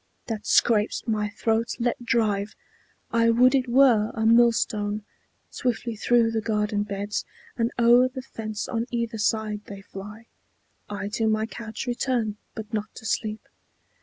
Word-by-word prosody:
That 225 -3 -5
scrapes 215 -2 +3
my 210 -2 0
throat, 225 +2 -1
let 240 0 -1
drive. 215 -3 0 0.6
I 230 0 +3
would 250 +3 +5
it 265 -2 +2
were 240 -4 +5
A 220 -1 -1
millstone! 220 -3 +3 0.5
Swiftly 235 -1 -2
through 230 +1 +3
the 225 -1 -1
garden 210 -1 0
beds 205 0 -3 0.3
And 230 -1 +1
o'er 240 +1 +6
the 255 0 -7
fence 215 -4 -5
on 230 0 -2
either 235 -2 -2
side 210 0 0
they 200 -1 -9
fly; 205 +4 -10 0.6
I 200 -1 -4
to 220 +1 0
my 215 0 +1
couch 225 0 -7
return, 240 -3 -1 0.2
but 220 0 -8
not 210 -1 -2
to - - -11
sleep. 215 -1 -2
225 Hz, 150 wpm, -25 LUFS, 210-235 Hz, 0.6 s, o'er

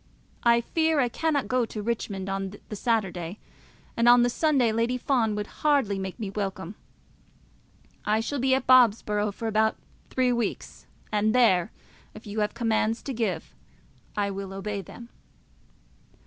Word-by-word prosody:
I 235 0 +4
fear 320 +4 +1
I 250 -3 +2
cannot 295 +2 0
go 255 -1 +1
to 220 -1 -5
Richmond 205 -4 -3
on 195 0 -3
the 210 - -5
Saturday, 195 -5 -1 0.6
and 235 +1 +4
on 240 0 +7
the 245 - +2
Sunday 270 -6 +2
Lady 230 +3 0
Fawn 235 -5 +1
would 210 0 -2 0.2
hardly 275 -10 +2
make 190 +3 -5
me 205 -3 -4
welcome. 195 -3 -4 1.3
I 215 +1 +1
shall 280 +5 -3
be 260 +1 +3
at 265 - -2
Bobsborough 210 -4 +4
for 225 +3 -5
about 220 0 +2 0.3
three 255 -1 +1
weeks, 235 -4 -4 0.2
and 215 +1 +1
there, 190 -9 +4 0.4
if 215 - -11
you 210 +1 -4
have 210 0 -1
commands 225 -1 0
to 270 - -4
give, 220 -6 -3 0.6
I 200 -1 0
will 195 0 -6
obey 200 +1 -4
them. 235 +6 -12
220 Hz, 155 wpm, -26 LUFS, 205-245 Hz, 1.3 s, on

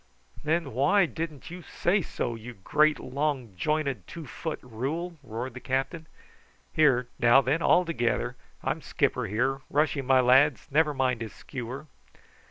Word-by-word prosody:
"Then 155 -3 0
why 180 - +4
didn't 155 0 -6
you 180 +1 -7
say 185 +3 0
so, 120 - -3
you 115 +1 -9
great, 150 +10 +2
long 135 -5 -2
jointed 140 - -1
two 165 -2 -8
foot 160 +4 -5
rule?" 145 +9 -4
roared 120 0 -5
the 130 - -7
captain. 135 +6 -2 0.7
"Here, 130 -6 +4
now 120 +2 +7
then, 140 +5 0
all 180 - +4
together. 125 -5 -1 0.3
I'm - - -1
skipper - - 0
here. 130 +7 0
Rush 150 +2 +2
him, 135 -3 -4
my 130 -1 +5
lads; 130 0 +4
never 150 0 +3
mind 130 -3 0
his 110 - -5
skewer." 130 +2 -7
135 Hz, 155 wpm, -28 LUFS, 125-155 Hz, 0.7 s, now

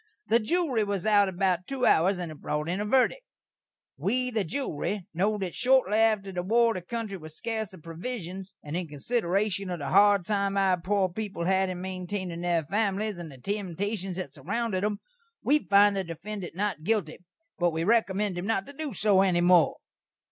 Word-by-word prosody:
The 230 - +5
jewry 265 -2 +1
was 200 -1 -2
out 205 -2 +4
about 185 -1 0
two 265 -2 -1
hours 185 +4 +4
and 175 -3 -4
brot 150 +1 -2
in 180 +4 -1
a - - -2
verdik: 265 - +3 0.8
"We, 250 0 0
the 220 -3 0
jewry, 200 - -3
know 205 +6 +1
that 190 -3 -4
shortly 250 -5 +3
atter 215 -3 +2
the 180 -1 -2
war 230 +5 +3
the 185 - -4
kountry 210 0 -5
was 155 -1 -11
scarce 220 -3 -3
of 185 -5 -14
provishuns, 185 +1 -6
and 150 +2 -5
in 180 -1 -2
considerashun 195 - -1
of 175 - -2
the 145 -3 -4
hard 200 -1 +5
time 200 0 0
our 190 -3 +2
poor 195 +1 +1
peepul 195 -2 -4
had 190 +1 +2
in 180 -1 -5
maintainin' 185 -1 -4
their 175 -2 +1
families, 205 +2 -1
and 165 -3 -7
the 135 - -12
temtashuns 195 - -3
that 185 0 -5
surrounded 195 - -2
'em, 210 0 0 0.5
we 295 +2 +4
find 205 -4 +4
the 195 - 0
defendant 175 +2 -7
not 200 -4 -1
guilty, 190 -4 -1 0.4
but 175 0 +3
we 165 0 -2
rekommend 205 -2 +1
him 185 - -4
not 225 -4 0
to 285 - -11
do 290 -4 -5
so 195 +2 +4
any 180 -3 +3
more." 175 -2 +5
195 Hz, 190 wpm, -28 LUFS, 175-215 Hz, 0.8 s, The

